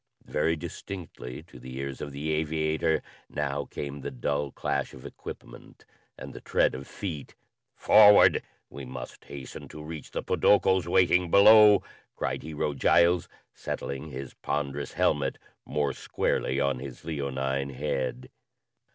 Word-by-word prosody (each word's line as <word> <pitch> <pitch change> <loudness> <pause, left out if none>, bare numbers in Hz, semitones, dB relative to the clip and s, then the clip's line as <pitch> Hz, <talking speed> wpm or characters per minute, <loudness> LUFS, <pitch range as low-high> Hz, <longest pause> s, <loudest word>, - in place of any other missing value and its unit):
Very 80 +2 +1
distinctly 80 -5 -8
to 80 -7 -15
the 65 +1 -9
ears 70 0 -5
of 70 - -5
the 75 +3 -3
aviator 80 +1 0 0.3
now 70 -1 -2
came 70 +1 -6
the - - -4
dull 70 +3 -2
clash - - -3
of 65 - -13
equipment - - -11 0.3
and - - -9
the - - -9
tread - - +2
of 65 +1 -7
feet. 80 -8 -6 0.4
"Forward! 105 -1 +7 0.3
We 70 - -9
must 65 -1 -9
hasten 70 -2 -9
to 75 - -10
reach 80 0 -8
the - - -4
podokos 95 -3 +3
waiting 90 0 +3
below," 105 +2 +8 0.3
cried - - -2
Hero 75 -1 -3
Giles, 85 +5 +3 0.2
settling 70 +3 -5
his 65 -1 -7
ponderous 70 0 -3
helmet 70 -3 +1 0.3
more 75 -1 0
squarely 65 +2 -1
on 70 -2 +1
his 70 0 -9
leonine 70 -3 -2
head. 65 -2 -3
70 Hz, 135 wpm, -28 LUFS, 70-80 Hz, 0.4 s, below